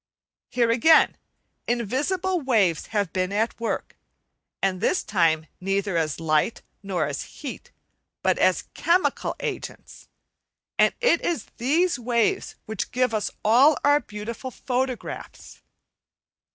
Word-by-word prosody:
Here, 235 -2 +2
again, 315 +8 +5 0.5
invisible 295 - 0
waves 210 - +2
have 205 -5 -1
been 185 0 0
at 220 +4 -1
work, 230 - -3 0.6
and 190 -1 0
this 360 - +1
time 160 -5 +2
neither 195 0 -1
as 160 -3 0
light 155 +6 +1 0.2
nor 195 -3 -1
as - - -3 0.2
heat, - - -7 0.5
but - - +2
as - - +3
chemical 355 +2 +1
agents, - - -6 0.7
and - - +4
it 480 -9 +3
is 330 -10 -1
these 315 +6 +1
waves 235 -2 0
which 220 -2 -4
give 250 -2 0
us 210 -2 0 0.2
all 260 +8 +6
our 290 +1 +5
beautiful 230 +1 -7
photographs. 255 0 -4
230 Hz, 120 wpm, -25 LUFS, 195-270 Hz, 0.7 s, all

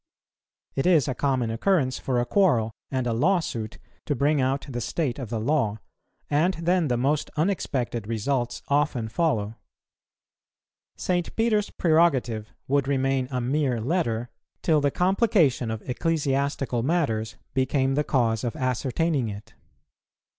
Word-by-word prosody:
It 135 - 0
is 160 -7 +4
a 130 - 0
common 130 -4 0
occurrence 130 - +1
for 125 -2 0
a 120 - +1
quarrel 125 - +2 0.2
and 130 -2 -1
a 120 - 0
lawsuit 120 - 0 0.3
to 145 - +1
bring 145 +2 +2
out 135 +2 0
the 120 -3 -4
state 140 +1 -2
of 125 -5 -5
the 115 -1 -2
law, 115 -4 +1 0.5
and 165 +6 +2
then 170 0 +1
the 125 -2 +1
most 140 +4 0
unexpected 130 - -1
results 120 +2 -1
often 140 -6 +1
follow. 110 -6 0 1.4
St. 175 -2 -1
Peter's 220 -2 +1
prerogative 135 -10 +2 0.2
would 140 0 +1
remain 135 -1 +1
a 125 -2 -2
mere 130 0 0
letter, 120 -4 -1 0.3
till 155 -3 +3
the 140 - +3
complication 180 - +2
of 110 -1 -5
ecclesiastical 140 -3 0
matters 115 -7 0 0.2
became 135 0 +1
the 150 +2 +1
cause 115 -6 +1
of 120 - -2
ascertaining 130 0 0
it. 105 0 -9
135 Hz, 140 wpm, -25 LUFS, 120-155 Hz, 1.4 s, is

